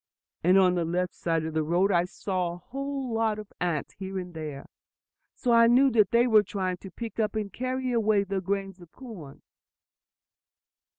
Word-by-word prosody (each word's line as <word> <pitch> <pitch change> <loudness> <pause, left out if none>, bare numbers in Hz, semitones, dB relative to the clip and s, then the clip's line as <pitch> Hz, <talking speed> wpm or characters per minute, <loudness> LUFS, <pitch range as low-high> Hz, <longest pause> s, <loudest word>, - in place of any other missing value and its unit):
And 180 +3 +5
on 185 -2 +5
the 175 -1 0
left 175 +2 -1
side 165 -2 -1
of 160 - -4
the 160 - +1
road 175 +6 +2
I 175 -1 +3
saw 180 -1 -3
a - - -8
whole 275 +3 -5
lot 225 -1 +1
of 210 -1 -10
ants 170 -5 -1
here 190 0 -6
and 180 -1 -6
there; 150 -4 -6 0.7
so 250 - -1
I 230 0 +6
knew 260 +3 +5
that 215 -4 +4
they 235 +1 +4
were 220 -3 +6
trying 185 -2 -3
to 195 - -10
pick 230 +5 -7
up 215 -1 0
and 210 -2 -3
carry 255 0 -2
away 215 -3 +2
the 195 -1 -3
grains 195 0 -3
of 175 -1 -15
corn." 195 - -11
195 Hz, 190 wpm, -27 LUFS, 175-230 Hz, 0.7 s, I